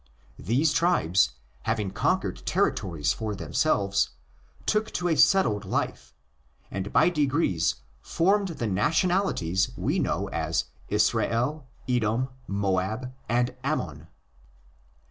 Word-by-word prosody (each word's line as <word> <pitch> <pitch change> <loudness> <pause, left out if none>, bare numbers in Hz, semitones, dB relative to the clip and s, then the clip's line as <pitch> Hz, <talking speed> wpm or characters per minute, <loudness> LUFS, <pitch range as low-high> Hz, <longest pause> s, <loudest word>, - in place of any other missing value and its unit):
These 135 - +2
tribes, 95 - +3 0.3
having 110 -3 -1
conquered - - -1
territories 80 -6 0
for 110 -2 -4
themselves, 100 0 +1 0.6
took 215 0 +1
to 175 0 0
a 160 - +2
settled 140 - +4
life, 95 - -3 0.6
and 95 +1 -4
by - - +5
degrees 145 - +1 0.3
formed 195 - +2
the 155 -9 -4
nationalities 115 - +1
we - - 0
know - - -1
as - - -1 0.3
Israel, 130 +5 +1 0.2
Edom, 120 +1 +1 0.2
Moab, 100 +5 -1 0.2
and 120 +1 +1
Ammon. 80 - -3
115 Hz, 105 wpm, -26 LUFS, 95-155 Hz, 0.6 s, by